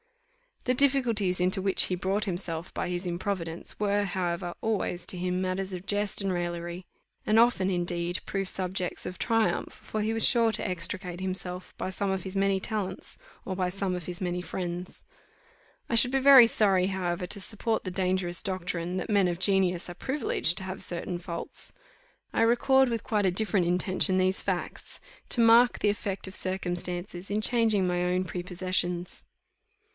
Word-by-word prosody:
The 250 - +3
difficulties 240 -9 +2
into 185 +2 +2
which 195 0 +6
he 180 - -1
brought 190 +4 -1
himself 175 -2 -4
by - - -3
his 180 +1 -2
improvidence 175 -2 -3
were, 205 0 +1
however, 175 -2 -2
always 205 -5 -1
to 185 - -2
him 180 +1 -1
matters 190 +1 -2
of 180 +1 -6
jest 205 0 0
and 195 -1 -1
raillery; 175 0 -4 0.4
and 215 +1 +4
often, 230 -5 +3
indeed, 175 0 -1
proved 195 -1 -2
subjects 185 -1 -3
of 180 - -6
triumph, 225 -1 0
for 215 - -5
he 220 +1 0
was 225 - +4
sure 230 -3 +4
to - - -3
extricate 180 0 -4
himself, 185 -1 -4
by - - -3
some 200 +1 -2
of 190 -2 -2
his 190 0 -6
many 195 0 +2
talents, 210 -2 -4 0.3
or 190 - -3
by 180 -1 0
some 190 0 -2
of 180 -3 -6
his 180 0 -6
many 180 -1 -2
friends. 180 0 -5 0.9
I - - -2
should 245 +2 +4
be 270 - +2
very 265 -3 +9
sorry, 195 -5 +3
however, 180 -2 -2
to 200 +2 -3
support 220 +3 -1
the 185 - -4
dangerous 180 -1 -1
doctrine, 180 -2 -2
that 185 - -3
men 200 -3 +3
of 175 -1 -2
genius 185 -2 +2
are 175 - -7
privileged 250 - 0
to - - -3
have 190 0 -5
certain 175 0 -3
faults. 170 -1 -2 0.6
I - - +1
record 255 +3 +4
with 230 -2 -2
quite 210 -3 0
a 185 - +3
different 200 -1 +1
intention 185 +1 +1
these 185 +1 +2
facts, - - -4 0.3
to 240 - +3
mark 230 +1 +6
the 210 - +2
effect 200 -2 -3
of 190 - -6
circumstances 180 0 -3
in 210 +1 0
changing 220 -4 +3
my 180 0 0
own 180 +1 +1
prepossessions. 180 0 -2
185 Hz, 175 wpm, -28 LUFS, 180-205 Hz, 0.9 s, very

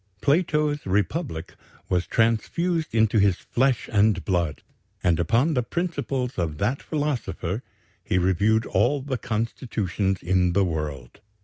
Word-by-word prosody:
Plato's 150 - +1
Republic 100 - -1 0.3
was 90 0 0
transfused 155 +9 0
into 110 -1 +3
his 100 -2 +4
flesh 130 +4 0
and 100 -5 +3
blood, 85 -5 -1 0.4
and 85 -2 +2
upon 120 - +2
the 125 - +2
principles 140 - -2
of 80 -3 -2
that 115 - 0
philosopher 120 - -2 0.4
he 100 - 0
reviewed 100 +5 +2
all 145 -2 +1
the 130 -3 -3
constitutions 105 -4 -2
in 90 0 +2
the 100 +1 +3
world. 75 -2 -5
110 Hz, 125 wpm, -25 LUFS, 90-135 Hz, 0.4 s, his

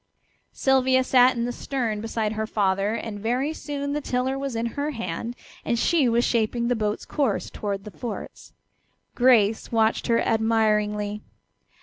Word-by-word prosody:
Sylvia 260 -1 +3
sat 255 0 +5
in 235 0 -1
the 245 - -2
stern 240 -5 -3
beside 225 -1 -2
her 220 0 -3
father, 200 0 +1
and 225 -3 -5
very 250 +8 -1
soon 285 -2 -4
the 295 - -1
tiller 255 0 -1
was 270 -2 -4
in 230 +1 -1
her 285 +1 -1
hand 230 - -4 0.3
and 235 - 0
she 285 +1 +3
was 235 +1 +2
shaping 235 +1 0
the 245 - +2
boat's 210 -1 -2
course 270 -9 -1
toward 200 -2 -4
the 210 - -9
forts. 235 0 -7 0.6
Grace 225 -4 +3
watched 225 -1 +1
her 230 -1 +3
admiringly. 210 -2 +1
230 Hz, 155 wpm, -25 LUFS, 215-260 Hz, 0.6 s, sat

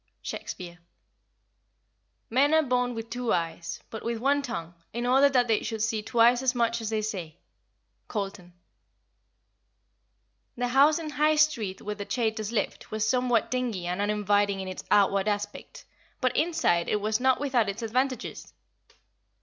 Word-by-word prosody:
SHAKESPEARE. 175 -1 -7 1.5
"Men 280 +6 +4
are 315 - +5
born 250 -2 0
with 225 0 -6
two 245 -1 -2
eyes, 165 0 -2
but 220 - -6
with 235 0 -2
one 280 +5 +2
tongue, 175 -11 -5 0.2
in 240 +2 -2
order 270 +3 +5
that 250 -3 +2
they 220 -2 +2
should 220 -2 -3
see 220 -1 0
twice 240 +2 +4
as 260 -1 +1
much 235 -1 +1
as 220 - -3
they 215 -1 -1
say." 180 -7 -5 0.7
COLTON. 195 -4 -5 2.1
The 245 0 -1
house 280 +4 +5
in 320 -2 -5
High 305 +1 +3
Street 240 -11 +1
where 210 - -3
the 205 -1 -7
Chaytors 220 -3 -1
lived 230 - -2
was 215 0 -1
somewhat 250 -2 +1
dingy 240 -8 -2
and 180 +3 -2
uninviting 205 -1 +1
in 190 - -5
its 185 - -6
outward 200 -1 +3
aspect, 205 0 -4 0.3
but 255 -3 0
inside 310 - +1
it 210 - +1
was 215 +1 0
not 260 0 +3
without 255 -7 +1
its 210 +4 -5
advantages. 255 +3 -2
225 Hz, 155 wpm, -27 LUFS, 205-255 Hz, 2.1 s, are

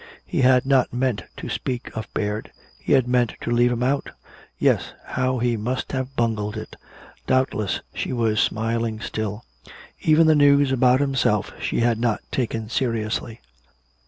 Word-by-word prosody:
He - - -1
had 130 0 +5
not 135 -2 +3
meant 120 -6 -1
to - - -6
speak 125 -2 -4
of 110 - -6
Baird 105 +1 -2 0.3
he - - 0
had 130 -3 +4
meant 125 -2 +1
to - - -3
leave 120 +1 +3
him 120 0 -1
out! 140 +2 0 0.5
Yes, - - +1
how 130 0 -1
he 120 0 +1
must 125 +5 -3
have 130 0 -3
bungled 110 -3 -1
it! 110 - -8 0.5
Doubtless 120 -7 +1
she - - -3
was 115 -3 +1
smiling 115 0 0
still. 110 -1 -4 0.6
Even 160 +1 +5
the 160 - +6
news 145 -2 +5
about 130 0 +4
himself 125 -7 +1
she - - -1
had 115 -1 +2
not 115 -2 0
taken 115 -3 -2
seriously. 115 -1 -2
120 Hz, 160 wpm, -23 LUFS, 110-130 Hz, 0.6 s, the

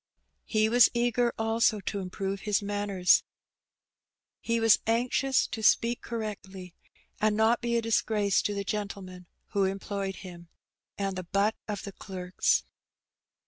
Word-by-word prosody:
He 215 -1 +2
was 240 +2 +6
eager 240 0 +2
also 225 -1 +2
to 200 +1 -4
improve 195 +1 -4
his 205 0 0
manners. 200 -3 +2 1.2
He 230 0 -1
was 225 -1 +5
anxious 250 +3 +2
to 220 - -5
speak 230 +2 +3
correctly, 195 -5 -6 0.5
and 215 0 +2
not 225 +2 +3
be 235 -1 0
a 230 - -1
disgrace 215 -3 +1
to 205 - -2
the 200 - -2
gentleman 195 -3 -5 0.2
who 200 -1 +1
employed 195 0 -3
him 175 -2 -11 0.5
and 195 -1 -2
the 185 - -4
butt 200 +4 +1
of 205 -2 -4
the 200 - -6
clerks. 185 -2 -1
205 Hz, 140 wpm, -28 LUFS, 195-225 Hz, 1.2 s, was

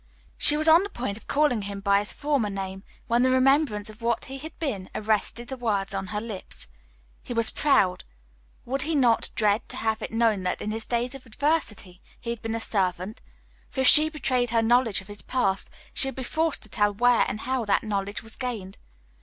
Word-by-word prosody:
She 295 - +5
was 310 +1 +2
on 325 +2 +7
the 405 - -4
point 240 - -4
of 220 - -14
calling 285 -6 +2
him 200 0 -6
by 200 0 +3
his 205 - -2
former 285 -7 -1
name, 195 -1 -5 0.2
when 235 +1 +2
the 260 - +3
remembrance 260 -4 +2
of 215 +1 -11
what 235 0 -1
he 270 0 -8
had 315 +3 -10
been 215 - -4
arrested 220 +2 -1
the 265 - -5
words 205 -5 -1
on 195 0 -3
her 210 +2 -3
lips. 215 -4 -6 0.5
He 245 - -7
was 230 -1 +4
proud; 195 -11 +2 0.6
would 270 +3 0
he 320 +3 0
not 245 -5 +3
dread 210 0 +2
to - - -6
have 220 0 -1
it - - -4
known 225 -3 +1
that, 180 0 -2
in 210 - -4
his 220 +1 -5
days 245 +2 -1
of 270 -2 -11
adversity, 215 - -2 0.2
he 235 - -4
had 235 -2 -6
been 225 0 -3
a - - -2
servant? 190 -1 -2 0.5
For 265 - -3
if 260 - +4
she 310 +1 +9
betrayed 255 -6 0
her 230 -1 +2
knowledge 235 -3 +2
of 190 - -16
his 205 0 -8
past, 195 -7 -1 0.2
she 270 - +6
would 270 - -5
be 260 - -5
forced 320 +5 -1
to 215 - -7
tell 205 0 +1
where 245 +2 +4
and 215 - -4
how 260 -1 -1
that 205 - +1
knowledge 200 -1 -3
was 225 0 -7
gained. 220 -7 -5
230 Hz, 220 wpm, -25 LUFS, 205-260 Hz, 0.6 s, she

